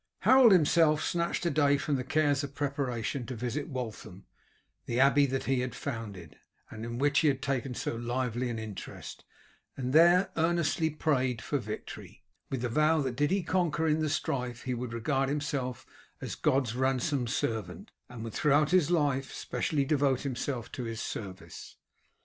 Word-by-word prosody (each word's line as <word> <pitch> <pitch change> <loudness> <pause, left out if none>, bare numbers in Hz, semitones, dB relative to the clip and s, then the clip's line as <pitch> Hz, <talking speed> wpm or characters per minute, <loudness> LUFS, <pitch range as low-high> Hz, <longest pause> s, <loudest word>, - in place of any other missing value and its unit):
Harold 260 -3 +7
himself 155 -3 +4
snatched 170 0 -1
a 170 - +2
day 145 -2 +3
from 145 0 -1
the 130 - -2
cares 145 0 +1
of 140 0 -7
preparation 135 -4 -2
to 125 +1 -6
visit 125 +5 -3
Waltham, 110 - -6 0.6
the 120 - -1
abbey 140 +1 +5
that 135 0 -2
he 135 -1 +1
had 125 -1 -3
founded, 110 - -6 0.3
and 110 - -7
in 115 +1 -5
which 145 +2 +3
he 160 - +3
had 135 -3 +2
taken 135 -2 -2
so - - -3
lively 120 +1 -2
an 115 - -3
interest, 110 -3 -8 0.5
and 130 0 -3
there 175 +4 +6
earnestly 165 -1 +1
prayed 130 -6 0
for 145 +4 -2
victory, 105 -2 -8 0.3
with 130 -3 -3
the - - +1
vow 155 +6 +3
that 130 -4 -2
did 145 +3 +1
he 195 -1 +1
conquer 165 -3 0
in 155 0 +2
the 155 -1 0
strife 125 -5 -2
he 130 - -2
would 120 0 -4
regard 135 +4 0
himself 140 -4 -3 0.3
as - - -5
God's 130 -4 +1
ransomed 130 0 0
servant, 100 -5 -3 0.2
and 120 -2 -8
would 115 - -6
throughout 150 +1 +3
his 180 -4 +4
life 145 -6 +1
specially 145 -3 -1
devote 135 -2 +2
himself 125 -2 -4
to 125 - -5
His 115 -1 -5
service. 95 -5 -7
135 Hz, 175 wpm, -30 LUFS, 120-150 Hz, 0.6 s, Harold